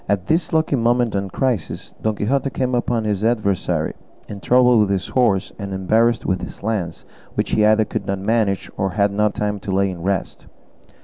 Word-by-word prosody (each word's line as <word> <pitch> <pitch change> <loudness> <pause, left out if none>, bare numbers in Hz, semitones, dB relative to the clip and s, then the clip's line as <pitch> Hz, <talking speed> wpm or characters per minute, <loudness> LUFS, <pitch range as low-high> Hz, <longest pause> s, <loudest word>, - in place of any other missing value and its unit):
At 100 -3 0
this 165 - +1
lucky 160 -2 +2
moment 120 -1 +1
and 100 -1 -2
crisis, 125 - -2
Don 110 -1 0
Quixote 135 +7 0
came 130 -1 -2
upon 120 -1 0
his 105 -1 -1
adversary, 110 -5 0 0.3
in 100 - -7
trouble 125 +2 +4
with 105 -2 +3
his 95 -1 -1
horse, 115 -7 +1
and 100 -1 -4
embarrassed 115 +5 +2
with 95 0 0
his - - -8
lance, 100 -7 -3 0.3
which - - -1
he 105 - +3
either 110 +1 +4
could - - -5
not 100 - -1
manage, 100 -1 0
or 95 -2 -1
had 100 +1 +2
no 105 +1 +2
time 105 0 -2
to 100 - -5
lay 95 0 +1
in 90 -2 -8
rest. 95 0 -3
105 Hz, 195 wpm, -20 LUFS, 100-120 Hz, 0.3 s, trouble